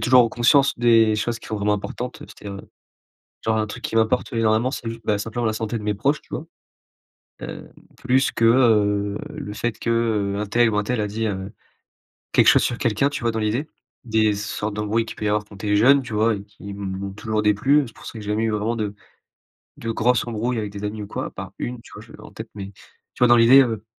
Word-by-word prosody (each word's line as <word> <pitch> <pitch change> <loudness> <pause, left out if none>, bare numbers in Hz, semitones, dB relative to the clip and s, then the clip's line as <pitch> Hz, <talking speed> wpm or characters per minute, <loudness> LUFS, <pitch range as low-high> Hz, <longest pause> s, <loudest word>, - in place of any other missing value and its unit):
toujours 125 -2 +5
conscience 135 +3 +4
des 115 -2 +5
choses 115 +2 -2
qui - - -13
sont 110 - -2
vraiment 105 0 +1
importantes. 125 +5 -5
C'est-à-dire, 100 -1 -9
heu, - - -19 0.8
genre 110 0 +1
un 110 - +1
truc 105 - -9
qui - - -3
m'importe 115 +4 +1
énormément, 115 +2 +2
c'est 125 -4 -5
ju 115 0 -5
bah 105 -1 +1
simplement 115 +3 -3
la 110 - 0
santé 110 +1 -3
de - - -9
mes 105 -1 -1
proches, 140 +8 0
tu - - -28
vois? 155 - -5 1.0
Heu, - - -7 0.3
plus 130 +1 +2
que, 115 - -1
heu, 105 -4 +3
le 105 - -7
fait 120 0 -3
que, - - -5
heu, 110 -4 +1
untel 110 +3 +2
ou 105 - -1
untel 110 +3 0
a 105 - 0
dit, 110 +2 -3
heu, 95 -1 -4 0.8
quelque - - +5
chose - - +6
sur 120 - -1
quelqu'un, 120 +4 +1
tu 145 - -5
vois 115 -1 +1
dans 110 - -3
l'idée? 115 +8 -1 0.4
Des 110 -2 +2
sortes 105 0 -4
d'embrouilles 105 +2 0
qu'il - - -8
peut 105 - -5
y - - +2
avoir 105 0 +1
quand 105 -1 -15
tu 105 - -4
es - - +4
jeune, 130 +6 +5
tu 115 - -8
vois? 110 +1 +2
Et 100 - -8
qui 100 -1 -11
m'ont 95 -1 -5
toujours 110 +1 -2
déplu, 130 +8 +3
c'est 115 - -16
pour - - -14
ça - - -6
que 110 - -8
j'ai 105 - -7
jamais 110 +2 0
eu 115 - +1
vraiment 105 +2 -1
de 105 -3 -3 0.8
de 115 - -5
grosse 125 +3 +1
embrouille 120 +1 -2
avec 105 -2 -3
des 100 - -7
amis 105 +1 -4
ou - - -6
quoi, - - -4
à - - -7
part - - -8
une, 120 -1 -4
tu - - -17
vois? - - -9
Je 115 - -15
l'ai - - -13
en - - -13
tête, 110 0 -8
mais 100 -1 -7 0.4
tu - - -17
vois 125 - +6
dans 120 - +7
l'idée, 120 +4 +8
heu 110 -4 -3
110 Hz, 250 wpm, -22 LUFS, 105-120 Hz, 1.0 s, l'idée